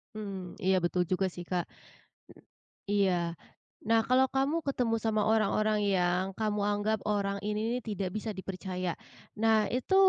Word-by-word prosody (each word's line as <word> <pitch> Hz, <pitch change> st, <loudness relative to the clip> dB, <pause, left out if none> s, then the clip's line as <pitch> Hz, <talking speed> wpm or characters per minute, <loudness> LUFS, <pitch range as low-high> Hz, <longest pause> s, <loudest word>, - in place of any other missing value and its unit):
Mmm, 195 Hz, -4 st, -6 dB
iya 190 Hz, 0 st, +3 dB
betul 180 Hz, +1 st, +2 dB
juga 185 Hz, +1 st, +2 dB
sih, 175 Hz, -, -7 dB
Kak. 180 Hz, -2 st, 0 dB, 1.3 s
Iya. 200 Hz, -2 st, +3 dB, 0.8 s
Nah, 225 Hz, 0 st, +5 dB
kalau 260 Hz, +1 st, +5 dB
kamu 275 Hz, +4 st, +2 dB
ketemu 245 Hz, -4 st, +1 dB
sama 220 Hz, -1 st, +1 dB
orang-orang 215 Hz, 0 st, +2 dB
yang 180 Hz, -2 st, +2 dB
kamu 210 Hz, -1 st, 0 dB
anggap 205 Hz, +1 st, +1 dB
orang 200 Hz, -1 st, 0 dB
ini 210 Hz, 0 st, -1 dB, 0.2 s
nih 250 Hz, -, -2 dB
tidak 200 Hz, -4 st, -3 dB
bisa 215 Hz, +1 st, -2 dB
dipercaya. 185 Hz, -2 st, -4 dB, 0.5 s
Nah, 225 Hz, 0 st, +4 dB, 0.2 s
itu 260 Hz, +10 st, 0 dB
205 Hz, 145 wpm, -30 LUFS, 190-220 Hz, 1.3 s, Nah